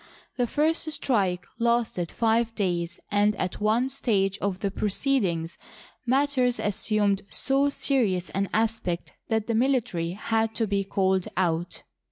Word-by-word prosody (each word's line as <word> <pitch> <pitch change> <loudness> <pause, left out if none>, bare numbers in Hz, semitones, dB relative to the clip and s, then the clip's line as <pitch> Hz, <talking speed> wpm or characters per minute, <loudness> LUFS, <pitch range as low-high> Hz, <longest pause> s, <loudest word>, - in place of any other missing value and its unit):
The 245 -1 0
first 315 +5 +1
strike 200 -12 0
lasted 230 -7 +1
five 230 0 +1
days, 175 -4 -1
and, 205 +1 +3
at 185 +2 -3
one 220 +4 +2
stage 205 -7 0
of 195 -2 -2
the 200 - -1
proceedings, 195 -6 0 0.5
matters 260 -1 +2
as 205 -2 0
sumed 205 -2 +1
so 275 +1 +2
serious 225 -11 0
an 195 -1 -1
aspect 220 -6 -1
that 220 -2 0
the 230 - -1
military 225 -9 +1
had 225 +2 -1
to 225 - +1
be 200 -1 0
called 190 -2 +1
out. 175 -2 -1
215 Hz, 140 wpm, -26 LUFS, 190-240 Hz, 0.5 s, and